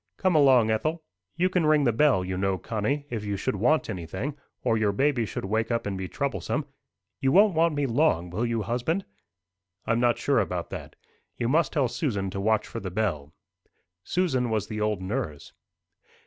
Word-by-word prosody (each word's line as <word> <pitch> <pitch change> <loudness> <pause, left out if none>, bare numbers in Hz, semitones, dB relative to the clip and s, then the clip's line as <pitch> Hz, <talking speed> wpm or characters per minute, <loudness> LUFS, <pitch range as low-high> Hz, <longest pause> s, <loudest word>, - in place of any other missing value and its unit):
"Come 185 -2 +2
along, 130 -7 +5
Ethel." 155 +9 -1 0.3
"You 175 +3 +2
can 185 -2 +1
ring 155 -1 +4
the 120 - +3
bell, 125 -7 +3
you 95 0 -3
know, 95 0 0
Connie, 120 +9 -2
if 110 -3 -3
you 100 -1 -2
should - - -1
want 125 +11 +2
anything, 95 - -4 0.3
or 115 - +2
your 110 -2 +2
baby 125 +1 +1
should 95 - -5
wake 110 +3 0
up 115 -1 -1
and 100 -1 -2
be 95 0 -4
troublesome. 140 +4 -2 0.5
You 135 - +2
won't 200 +3 +6
want 165 -1 +2
me 145 -1 0
long, 115 - +1
will 105 +6 -2
you, 115 -2 0
husband?" 125 - -1 0.8
"I'm 115 0 +1
not 120 -1 +3
sure - - +2
about - - -2
that. - - -7 0.4
You 120 - -1
must 155 +1 +2
tell 140 -4 +2
Susan 105 - -2
to 95 - -4
watch 110 +1 +2
for 115 - -6
the 95 - -5
bell." 90 -8 -2 0.7
Susan 130 - 0
was 110 -2 0
the 110 -1 -5
old 105 -3 0
nurse. 95 - -4
115 Hz, 190 wpm, -26 LUFS, 100-145 Hz, 0.8 s, won't